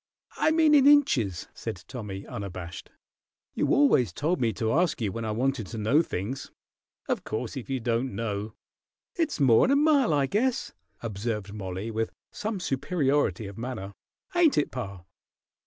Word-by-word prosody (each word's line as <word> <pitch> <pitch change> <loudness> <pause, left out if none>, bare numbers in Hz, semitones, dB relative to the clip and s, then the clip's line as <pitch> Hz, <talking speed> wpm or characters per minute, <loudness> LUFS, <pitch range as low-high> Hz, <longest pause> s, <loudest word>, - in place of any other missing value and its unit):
"I 310 - +2
meant 315 -1 +4
in 280 -2 +7
inches," 135 - +4
said 90 - -6
Tommy, 105 -6 -6
unabashed. 95 -3 -7 0.6
"You - - 0
always 200 - +4
told 155 - -1
me 115 -2 +2
to 110 +2 -1
ask 170 +1 +2
you 105 -4 -1
when 115 +3 -4
I - - -2
wanted 125 -1 -1
to 115 - -7
know 115 +9 +3
things. 125 - -4 0.6
Of - - -1
course, 110 +2 -4
if 135 -2 -6
you 135 -1 -1
don't 120 0 -1
know 105 -1 -3 0.3
" - - -67
"It's 320 - 0
more'n 130 - +5
a 280 - +5
mile, 285 - +4
I 145 -2 +3
guess," 235 - 0 0.3
observed 105 -2 -3
Mollie, 95 +1 -5
with 110 0 -1 0.2
some 210 -2 -3
superiority 135 - 0
of 100 +2 -8
manner. 115 -5 -5 0.4
"Ain't 345 -4 +4
it, 150 - +1
pa?" 100 -8 -6
120 Hz, 165 wpm, -27 LUFS, 105-170 Hz, 0.6 s, in